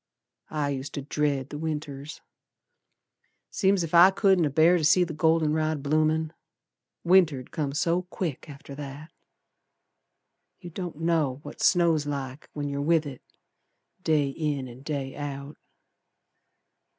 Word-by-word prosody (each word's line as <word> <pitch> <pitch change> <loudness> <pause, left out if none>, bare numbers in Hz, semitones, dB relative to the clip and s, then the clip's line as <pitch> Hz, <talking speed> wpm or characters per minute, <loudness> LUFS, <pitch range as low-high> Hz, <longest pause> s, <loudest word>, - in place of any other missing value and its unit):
I 150 -2 -1
used 135 0 -5
to 140 - -4
dread 145 -2 -1
the 150 - -6
Winters. 150 -2 -5 1.3
Seem's 195 -2 +2
ef 165 - -6
I 175 +2 +9
couldn't 190 -3 +3
abear 160 +5 +4
to - - -3
see 170 +4 +5
the 170 -2 -4
golden 160 -1 +2
rod 155 -2 -1
bloomin'; 155 +2 +1 0.7
Winter'd 170 -8 +3
come 145 -3 -2
so 170 +4 +1
quick 175 -5 -5
after 140 0 -10
that. 145 +2 -8 1.5
You 175 -2 -10
don't 170 -3 -6
know 160 -6 +1
what 145 - -9
snow's 165 -4 +3
like 140 -1 -5
when 145 -1 -3
yer 140 0 -3
with 160 +1 +2
it 135 -3 -8 0.8
Day 155 -5 +2
in 140 -2 -3
an' 125 +1 -12
day 140 -2 -4
out. 140 0 -6
150 Hz, 135 wpm, -26 LUFS, 140-165 Hz, 1.5 s, I